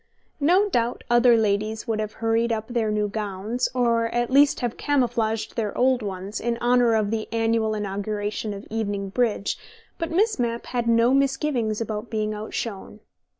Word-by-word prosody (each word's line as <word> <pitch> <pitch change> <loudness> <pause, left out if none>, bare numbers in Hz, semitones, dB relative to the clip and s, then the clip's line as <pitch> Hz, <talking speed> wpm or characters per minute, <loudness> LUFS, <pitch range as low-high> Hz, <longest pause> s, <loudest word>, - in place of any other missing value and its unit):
No 360 +8 +4
doubt 240 - -1
other 240 0 +6
ladies 215 0 0
would 220 -1 -1
have 215 -1 -3
hurried 230 +1 0
up 220 +1 -2
their 235 -3 0
new 210 0 0
gowns, 210 +3 -2
or 235 -2 +2
at 240 +1 -1
least 280 +1 +4
have 240 -2 -2
camouflaged 235 -6 0
their 215 -3 -2
old 255 0 +3
ones, 195 0 -5
in 235 0 -1
honour 240 -1 +3
of 215 -1 +1
the 220 -1 -3
annual 225 -1 +1
inauguration 205 +1 -3
of 200 0 -7
evening 205 -3 -2
bridge, 215 -2 0 0.4
but 330 - -2
Miss 415 - +1
Mapp 235 -1 -1
had 240 -2 -2
no 230 +2 +4
misgivings 270 -5 +1
about 220 0 -4
being 215 -1 -1
outshone. 210 0 -5
225 Hz, 165 wpm, -24 LUFS, 215-245 Hz, 0.4 s, other